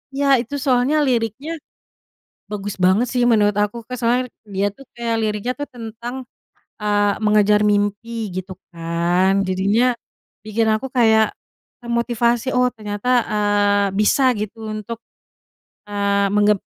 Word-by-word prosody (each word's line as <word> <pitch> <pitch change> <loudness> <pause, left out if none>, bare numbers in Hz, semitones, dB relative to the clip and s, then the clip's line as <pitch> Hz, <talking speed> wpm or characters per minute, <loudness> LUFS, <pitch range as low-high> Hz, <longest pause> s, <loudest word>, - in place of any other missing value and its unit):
Iya, 285 +1 0 0.2
itu 285 +4 -6
soalnya 255 +2 +2
liriknya 245 +3 -1 1.0
bagus 205 -1 -4
banget 190 +7 +4
sih 250 -1 +1
menurut 210 -2 +3
aku, 210 +3 -2
Kak. 250 - -5
Soalnya 245 +2 +2 0.3
dia 195 +1 +1
tuh 275 - -14
kayak 235 -1 -2
liriknya 215 +3 -1
tuh 290 - -2
tentang, 235 +2 -7 0.6
eee, 205 -1 +2
mengejar 210 0 +4
mimpi 205 +2 0 0.3
gitu 185 0 -5 0.2
kan, 170 +3 +1 0.2
jadinya 200 +5 +2 0.6
bikin 220 +1 0
aku 220 +5 -3
kayak 220 -2 +4 0.5
termotivasi, 235 0 0
oh, 250 0 +3
ternyata, 210 +1 -5 0.3
eee, 205 -1 +2
bisa 215 +6 +3 0.2
gitu 215 +2 -5
untuk, 215 +2 -5 0.9
eee, 200 -1 +1
menggep 210 0 +4
215 Hz, 125 wpm, -20 LUFS, 205-235 Hz, 1.0 s, banget